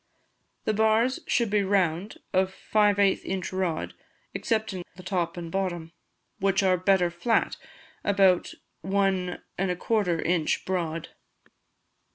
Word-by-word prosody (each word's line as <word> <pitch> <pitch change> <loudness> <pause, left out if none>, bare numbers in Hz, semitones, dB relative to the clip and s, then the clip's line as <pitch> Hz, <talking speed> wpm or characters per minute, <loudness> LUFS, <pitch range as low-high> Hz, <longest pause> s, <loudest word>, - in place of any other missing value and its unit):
The 215 - +1
bars 220 +4 +2
should 235 -4 +1
be 210 -1 +3
round, 190 -1 0 0.2
of 185 0 +2
five 210 +1 +2
eighth 200 -1 +3
inch 190 -1 -3
rod, 185 -4 -2 0.4
excepting 215 -5 -1
the 185 - -12
top 180 -3 -2
and 170 -1 -6
bottom, 175 -4 -2 0.5
which 195 +1 +2
are 185 -1 +4
better 180 -1 +2
flat, 225 +7 +1 0.5
about 195 -3 +3 0.3
1 190 -2 0 0.2
1/4 180 -1 0
in. 165 -2 +1 0.2
broad. 165 -3 -2
190 Hz, 120 wpm, -27 LUFS, 175-200 Hz, 0.5 s, are